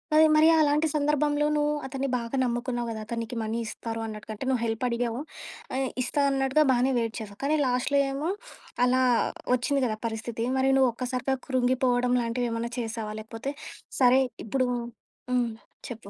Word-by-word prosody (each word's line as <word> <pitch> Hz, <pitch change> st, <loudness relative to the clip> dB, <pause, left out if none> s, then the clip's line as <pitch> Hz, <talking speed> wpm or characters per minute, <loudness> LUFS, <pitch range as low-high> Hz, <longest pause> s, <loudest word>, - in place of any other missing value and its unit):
అది 315 Hz, 0 st, +8 dB
మరి 310 Hz, +1 st, +6 dB
అలాంటి 300 Hz, +1 st, +3 dB
సందర్భంలో 295 Hz, 0 st, +1 dB
నువ్వు 295 Hz, 0 st, +2 dB
అతన్ని 270 Hz, +1 st, -3 dB
బాగా 235 Hz, +2 st, -4 dB
నమ్ముకున్నావు 240 Hz, 0 st, -2 dB
గదా! 220 Hz, -1 st, -4 dB
అతను 235 Hz, +1 st, -4 dB
నీకి 230 Hz, +1 st, -6 dB
మనీ 220 Hz, +1 st, -2 dB
ఇస్తారు 225 Hz, +1 st, -5 dB
అన్నట్టుగా. 215 Hz, 0 st, -7 dB
అంటే 260 Hz, -, -6 dB
నువ్వు 250 Hz, -3 st, +1 dB
హెల్ప్ 225 Hz, +2 st, -2 dB
అడిగావు. 235 Hz, 0 st, -1 dB, 0.6 s
ఆహ్, 265 Hz, -1 st, 0 dB
ఇస్తా 285 Hz, +3 st, 0 dB
అన్నట్టుగా 270 Hz, +2 st, +2 dB
బాగానే 255 Hz, +2 st, +2 dB
వెయిట్ 230 Hz, -1 st, -2 dB
చేసావు. 205 Hz, -2 st, -9 dB
కానీ 300 Hz, +2 st, +2 dB
లాస్ట్‌లో 250 Hz, +3 st, +1 dB
ఏమో 295 Hz, +5 st, -2 dB, 0.6 s
అలా 255 Hz, +1 st, +3 dB, 0.5 s
వచ్చింది 265 Hz, +3 st, +1 dB
గదా! 215 Hz, -2 st, -1 dB
పరిస్థితి. 230 Hz, +1 st, -3 dB
మరి 265 Hz, +1 st, +3 dB
నువ్వు 260 Hz, -2 st, +5 dB
ఒక్కసారిగా 255 Hz, +2 st, -2 dB
కృంగిపోవడం 250 Hz, -1 st, +2 dB
లాంటివి 235 Hz, +1 st, -1 dB
ఏమన్నా 230 Hz, +1 st, -3 dB
చేసావా? 225 Hz, -2 st, -4 dB
లేకపోతే 225 Hz, +5 st, -5 dB, 0.5 s
సరే 255 Hz, +1 st, +6 dB, 0.2 s
ఇప్పుడు 255 Hz, +3 st, 0 dB, 0.6 s
హ్మ్. 245 Hz, -2 st, +1 dB, 0.4 s
చెప్పు. 225 Hz, -4 st, -8 dB
250 Hz, 160 wpm, -27 LUFS, 230-270 Hz, 0.6 s, అది